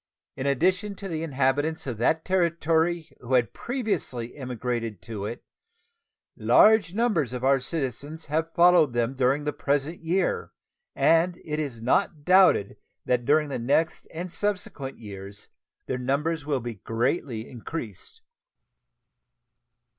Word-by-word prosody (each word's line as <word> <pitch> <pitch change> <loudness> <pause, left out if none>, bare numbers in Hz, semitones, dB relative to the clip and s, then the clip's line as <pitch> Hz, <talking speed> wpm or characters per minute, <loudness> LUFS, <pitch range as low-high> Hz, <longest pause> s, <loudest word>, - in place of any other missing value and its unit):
In 130 - -3
addition 185 +8 +1
to 195 - -7
the 160 -4 -3
inhabitants 145 +1 0
in 125 -5 -4
that 155 +8 +1
Territory 170 -2 +1
who 125 +1 -1
had 120 -3 +2
previously 195 - -3
emigrated 120 -5 -3
to 105 -3 -5
it, 120 - -7 0.9
large 215 -4 +5
numbers 205 - +1
of 125 0 -5
our 135 0 +4
citizens 145 +2 -4
have 160 +2 -1
followed 170 -6 +5
them 120 +1 0
during 135 +2 +1
the 150 0 -2
present 145 +4 -1
year, 195 - -1 0.4
and 170 +2 +3
it 150 -1 -2
is 130 -7 -4
not 150 +3 +1
doubted 185 - +5 0.3
that 125 -1 +1
during 150 +2 +3
the 135 - -3
next 140 +7 0
and 175 +2 -6
subsequent 185 -9 -3
years 100 -2 -10 0.4
their 125 - -3
numbers 145 +4 -1
will 140 -4 0
be 120 0 -5
greatly 115 - -2
increased. 125 - -8
145 Hz, 130 wpm, -26 LUFS, 125-170 Hz, 0.9 s, large